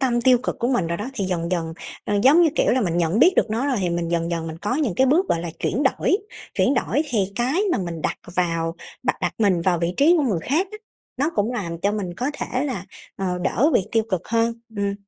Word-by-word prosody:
tâm 240 -3 +1
tiêu 250 0 +5
cực - - -3
của 240 - 0
mình 245 -9 +1
rồi 170 +1 -2
đó 210 +7 -5
thì 200 - -2
dần 170 -2 -2
dần, 165 -3 -1 0.3
ờ, 205 - -1
giống 295 +8 +6
như, 330 - +5
kiểu, - - +3
là 255 - +2
mình 175 -6 0
nhận 170 +4 +1
biết 350 +9 +6
được 225 - +2
nó 230 +5 0
rồi 270 -3 +1
thì 180 - 0
mình 170 0 -1
dần 170 0 0
dần 165 -1 -2
mình 160 0 -6
có 210 +8 -1
những 275 - 0
cái 265 +6 +3
bước, 340 +8 +3
gọi 165 - +1
là, 170 0 -4
chuyển 250 +9 -1
đổi. 295 +6 +2 0.4
Chuyển 270 - +2
đổi 290 - +1
thì 200 -7 0
cái 265 +10 +1
mà - - +1
mình 170 -3 -4
đặt - - -1 0.2
vào 165 -2 0 0.3
đặt 255 - +1
đặt - - -1
mình 195 -5 +3
vào 175 -1 +1
vị 170 +1 -1
trí 325 +5 +5
của 315 - +2
người 210 - 0
khác 320 +9 +1
á, 425 - -7 0.4
nó 285 +5 +1
cũng 210 +4 0
làm 170 -8 -4
cho 200 +3 0
mình 190 -5 -3
có 255 +4 -1
thể 260 -2 -2
là, 245 -10 -3 0.3
ờ, 185 -2 -2
đỡ 290 +7 +2
bị 185 - +2
tiêu 225 - +3
cực 185 -3 0
hơn, 230 0 +1 0.2
ừm. 200 0 -1
210 Hz, 265 wpm, -23 LUFS, 175-260 Hz, 0.4 s, giống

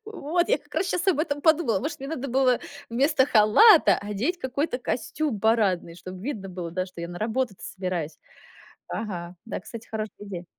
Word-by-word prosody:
Вот 350 -5 -1
я - - +3
как - - -21
раз 375 - +1
щас 360 +1 -1
об 350 -6 +3
этом 290 -3 -1
подумала. 315 - +3
Может, 300 +3 -4
мне 275 - -5
надо 275 -3 -4
было 255 -1 +3 0.3
вместо 270 +2 +3
халата 265 - +7
одеть 210 - -2
какой-то 260 0 -2
костюм 255 -1 -2
парадный, 205 -7 +2
чтоб 185 +1 -9
видно 200 -1 -5
было, 175 -2 -6
да, 185 +2 -2
что 180 -2 -10
я 170 - -4
на 175 0 -7
работу-то 220 -1 -2
собираюсь. 180 -5 -4 0.7
Ага, 180 -5 -5
да, - - -4
кстати, 230 -1 -10
хорошая 215 -1 -5
идея. 180 -3 -6
230 Hz, 180 wpm, -26 LUFS, 190-290 Hz, 0.7 s, халата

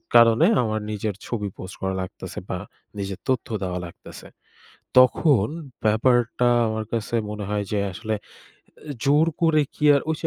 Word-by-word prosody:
কারণে 115 +6 +7 0.2
আমার 110 -1 -1
নিজের 105 -1 -3
ছবি 105 -4 -3
পোস্ট 95 +1 -8
করা 95 0 -1
লাগতেছে 95 - -7
বা - - -2 0.4
নিজের 100 -1 -4
তথ্য 130 -3 0 0.2
দেওয়া 90 -1 -2
লাগতেছে। 85 - -12 0.7
তখন 130 - +5 0.4
ব্যাপারটা 120 +2 +3 0.2
আমার 110 0 -2
কাছে 115 0 -2 0.2
মনে 105 -1 -5
হয় 105 -1 -1
যে 105 - +1
আসলে 110 +4 -3 0.8
এ - - -2
জোর 150 +3 +4
করে 160 -2 +4
কি - - -4
আর, 140 - +3
ওই 160 - 0
যে - - -1
110 Hz, 160 wpm, -24 LUFS, 105-130 Hz, 0.8 s, কারণে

